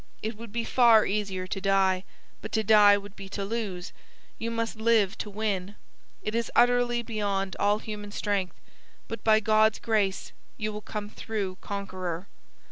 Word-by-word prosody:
It 220 Hz, +1 st, -3 dB
would 230 Hz, 0 st, -10 dB
be 235 Hz, +1 st, -2 dB
far 230 Hz, -3 st, +5 dB
easier 195 Hz, -2 st, -2 dB
to 195 Hz, +1 st, -4 dB
die; 190 Hz, -1 st, +2 dB, 0.4 s
but -, -, -7 dB
to 220 Hz, -, +2 dB
die 205 Hz, -1 st, +7 dB
would 205 Hz, 0 st, -10 dB
be 195 Hz, -1 st, -9 dB
to 200 Hz, 0 st, -4 dB
lose; 200 Hz, -5 st, -4 dB, 0.5 s
you 230 Hz, -, -2 dB
must 230 Hz, -1 st, -2 dB
live 220 Hz, -3 st, +3 dB
to 210 Hz, -, -4 dB
win. 205 Hz, -2 st, -2 dB, 0.5 s
It 215 Hz, -, -3 dB
is 230 Hz, -1 st, -1 dB
utterly 245 Hz, 0 st, +3 dB
beyond 200 Hz, -4 st, -2 dB
all 205 Hz, +1 st, +3 dB
human 210 Hz, -1 st, -7 dB
strength; 200 Hz, -3 st, -1 dB, 0.5 s
but 230 Hz, -2 st, -6 dB
by 220 Hz, -1 st, +5 dB
God's 215 Hz, 0 st, +3 dB
grace 210 Hz, -4 st, 0 dB, 0.3 s
you 215 Hz, -1 st, -3 dB
will 210 Hz, -, -6 dB
come 210 Hz, -1 st, -5 dB
through 205 Hz, -3 st, -4 dB
conqueror.' 185 Hz, -3 st, -4 dB
210 Hz, 165 wpm, -27 LUFS, 195-220 Hz, 0.5 s, die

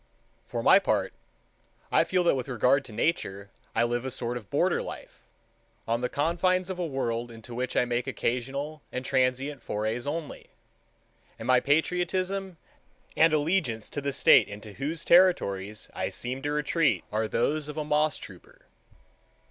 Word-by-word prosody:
For -, -, -3 dB
my -, -, +7 dB
part, -, -, 0 dB, 0.8 s
I -, -, +5 dB
feel 185 Hz, -1 st, +1 dB
that 170 Hz, -, +4 dB
with 130 Hz, -1 st, -3 dB
regard 130 Hz, +2 st, +2 dB
to 120 Hz, -, -10 dB
Nature 100 Hz, -, -2 dB, 0.2 s
I -, -, +3 dB
live 120 Hz, +1 st, 0 dB
a 130 Hz, -, -3 dB
sort 120 Hz, -2 st, -3 dB
of 110 Hz, -5 st, -7 dB
border -, -, +1 dB
life, -, -, -10 dB, 0.6 s
on 115 Hz, +1 st, 0 dB
the 125 Hz, -, -1 dB
confines 180 Hz, +4 st, +1 dB
of 185 Hz, -, -6 dB
a 175 Hz, -, 0 dB
world 120 Hz, -4 st, -2 dB
into 115 Hz, +1 st, -11 dB
which 125 Hz, +2 st, -3 dB
I -, -, +4 dB
make 120 Hz, +1 st, -2 dB
occasional 135 Hz, +4 st, -3 dB
and 125 Hz, +1 st, -4 dB
transient 130 Hz, +1 st, 0 dB
forays 110 Hz, +4 st, -3 dB
only, 155 Hz, 0 st, -5 dB, 0.9 s
and 115 Hz, -, -8 dB
my 130 Hz, 0 st, +5 dB
patriotism 180 Hz, +5 st, 0 dB, 0.6 s
and 165 Hz, 0 st, +5 dB
allegiance 150 Hz, -, 0 dB
to 145 Hz, -, -3 dB
the 140 Hz, 0 st, -1 dB
state 135 Hz, -, +6 dB
into 105 Hz, +1 st, -9 dB
whose 150 Hz, +8 st, -3 dB
territories 105 Hz, -, +3 dB
I -, -, -2 dB
seem 130 Hz, +2 st, -4 dB
to 145 Hz, -, -2 dB
retreat 150 Hz, -, +1 dB
are 110 Hz, +1 st, 0 dB
those 145 Hz, +7 st, 0 dB
of 150 Hz, 0 st, -7 dB
a 155 Hz, -, -2 dB
moss 150 Hz, 0 st, +2 dB
trooper. 90 Hz, -4 st, -13 dB
135 Hz, 165 wpm, -27 LUFS, 120-155 Hz, 0.9 s, my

